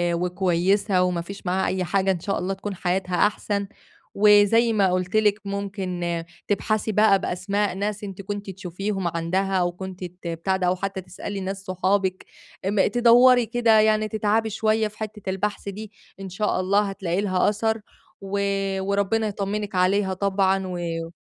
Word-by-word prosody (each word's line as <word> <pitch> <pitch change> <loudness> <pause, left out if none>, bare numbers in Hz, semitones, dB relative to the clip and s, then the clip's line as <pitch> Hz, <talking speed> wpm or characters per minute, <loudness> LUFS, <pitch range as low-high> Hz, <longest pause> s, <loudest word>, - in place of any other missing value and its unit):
وكويسة 180 +2 +1
وما 180 -2 0
فيش 195 +3 -10
معاها 185 +2 0
أي 185 0 -1
حاجة، 190 +1 +1
إن 175 - -2
شاء 195 +3 -2
الله 190 +2 -2
تكون 195 +1 -6
حياتها 180 0 -1
أحسن، 200 -1 -3 0.5
وزي 210 +3 +5
ما 195 -3 +3
قُلت 180 +2 -1
لِك 210 -1 +3
ممكن 185 -4 -3 0.2
تبحثي 215 +1 0
بقى 210 -2 +4
بأسماء 200 +2 -1
ناس 205 +1 -3
أنتِ 195 -1 -6
كنتِ 205 0 -5
تشوفيهم 190 +1 -4
عَندها، 180 +4 -1
أو 175 -1 +1
كنتِ 185 0 -8
ت 180 0 -8
بتاع 170 +3 -1
ده 180 -1 0
أو 180 - +2
حتّى 190 0 -4
تسألي 190 +2 -7
ناس 195 +1 -5
صحابِك، 185 +1 0 0.4
ام 200 0 +2
تدوّري 245 +2 +5
كده 230 -1 +3
يعني 215 0 +3
تتعبي 220 +1 0
شوية 220 +1 +1
في 210 - -15
حتّة 210 -2 -6
البحث 200 +1 -2
دي، 210 +1 -8 0.3
إن 195 -1 -6
شاء 210 0 -1
الله 195 +2 +2
هتلاقي 190 -1 -2
لها 185 -1 +2
أثَر، 220 +1 -1 0.4
و 195 +1 -3 0.4
وربنا 200 +3 0
يطمّنِك 200 0 -3
عليها 190 +1 +2
طبعًا 195 0 +1
و 170 -2 -4
195 Hz, 160 wpm, -24 LUFS, 185-210 Hz, 0.5 s, وزي